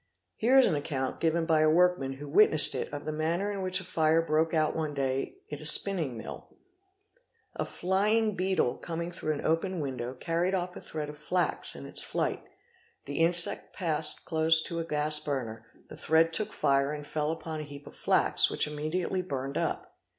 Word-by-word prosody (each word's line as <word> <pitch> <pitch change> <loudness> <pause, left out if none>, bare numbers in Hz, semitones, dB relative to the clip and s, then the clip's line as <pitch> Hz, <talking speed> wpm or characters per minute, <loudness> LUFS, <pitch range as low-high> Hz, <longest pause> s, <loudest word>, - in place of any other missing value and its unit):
Here 245 +4 +3
is 265 - +7
an 185 - +1
account 140 -3 -3
given 165 0 0
by 160 -2 +2
a 155 0 +4
workman 170 -5 +2
who 145 +2 -10
witnessed 155 0 +6
it - - -4
of 145 - -7
the 155 - -3
manner 165 +6 -2
in 200 -1 -5
which 185 0 +1
a - - -8
fire 160 -2 +1
broke 160 +1 +1
out 155 -2 0
one 155 -2 -3
day 135 -1 -2
in 150 - -7
a - - -11
spin 195 +6 +5
ning 135 -8 -4
mill, 110 - -9 1.1
A - - -3
flying 210 +4 0
beetle 185 -9 0
coming 170 0 -5
through 155 -3 -3
an 145 - -6
open 170 +3 -1
window 130 -3 -5
carried 170 +7 -1
off 180 -1 -4
a - - -9
thread 155 -2 -6
of 150 0 -11
flax 175 +3 -1
in - - -9
its - - -2
flight; - - -2 0.6
the 140 +2 -5
insect 170 +1 +4
passed 160 -4 +1
close 160 -1 +3
to 170 -1 -5
a - - -2
gas 150 -1 +3
burner, 120 -7 -5 0.2
the - - -12
thread 165 +1 +2
took 215 +5 0
fire 140 +1 +1
and 150 -1 -7
fell 150 +1 -3
upon 160 -1 -5
a - - -5
heap 145 0 -11
of - - -13
flax, - - +3
which - - +1
immediately 155 +5 -3
burned 140 -5 -5
up. - - -3
160 Hz, 200 wpm, -28 LUFS, 150-175 Hz, 1.1 s, is